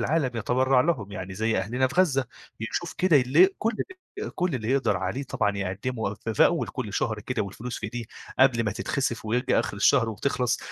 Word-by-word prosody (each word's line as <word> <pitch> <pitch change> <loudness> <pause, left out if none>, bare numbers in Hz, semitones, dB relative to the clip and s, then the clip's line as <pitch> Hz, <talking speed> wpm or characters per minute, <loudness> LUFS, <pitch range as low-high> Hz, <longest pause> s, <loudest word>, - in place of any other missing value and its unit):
العالم 140 +2 +1
يتبرّع 130 +3 +3
لهم، 125 - 0
يعني 95 -2 -6
زي 110 +2 0
أهلنا 120 +7 +1
في - - -9
غزة، 135 -8 +2 0.3
يشوف 160 +10 -3
كده 180 -5 +5
اللي 145 +9 +6
كلّ 225 +1 0 0.5
اللي 425 - -4
كلّ 180 -5 -1
اللي 115 0 -2
يقدر 120 -7 +2
عليه 125 +9 -2
طبعًا 105 -6 -1
يقدّمه، 100 +3 -3
في 110 +1 -5
في - - +6
أول - - -1
كلّ - - -5
شهر - - -1
كده 125 -4 -2
والفلوس 115 +5 -6
في - - -9
إيديه، 120 -1 -4 0.3
قبل 130 -3 +4
ما 105 - 0
تتخسف 120 0 -2
ويرجع 125 +4 +1
آخر 110 -3 -4
الشهر 115 +2 +4
وبتخلص، 125 +2 0
120 Hz, 195 wpm, -26 LUFS, 110-135 Hz, 0.5 s, اللي